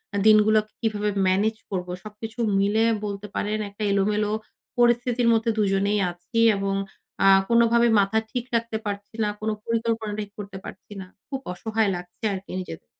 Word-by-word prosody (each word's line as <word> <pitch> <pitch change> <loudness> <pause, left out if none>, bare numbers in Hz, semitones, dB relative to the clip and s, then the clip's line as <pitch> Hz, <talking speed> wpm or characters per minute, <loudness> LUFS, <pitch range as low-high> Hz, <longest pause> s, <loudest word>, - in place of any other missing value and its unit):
আ - - +1
দিনগুলোকে 215 0 +5
কিভাবে 210 -2 0 0.2
ম্যানেজ 205 +4 +2
করবো? 180 -2 -3
সবকিছু 220 +3 -9 0.2
মিলায়া 220 +3 +3
বলতে 200 0 -5
পারেন 210 +1 -1
একটা 205 +2 -7
এলোমেলো 210 +1 +1 0.5
পরিস্থিতির 240 0 +3
মধ্যে 225 +1 +1
২ 210 -2 +2
জনেই 200 +2 +1
আছি 175 +7 -4 0.2
এবং 195 0 -1 0.5
আ - - +7 0.2
কোনোভাবে 235 0 +4
মাথা 200 +3 +2
ঠিক 245 -1 -3
রাখতে 230 -1 -1
পারছি 205 +1 -5
না, 210 - +1
কোন 215 0 -2 0.2
পরিকল্পনা 225 -2 -1
ঠিক 205 -1 -5
করতে 200 -1 -7
পারছি 190 - -11
না। - - -8 0.2
খুব 270 -2 -3
অসহায় 220 +2 0
লাগছে 175 +3 -10
আরকি 190 0 -7
নিজেদের। 180 - -8
210 Hz, 160 wpm, -24 LUFS, 200-225 Hz, 0.5 s, আ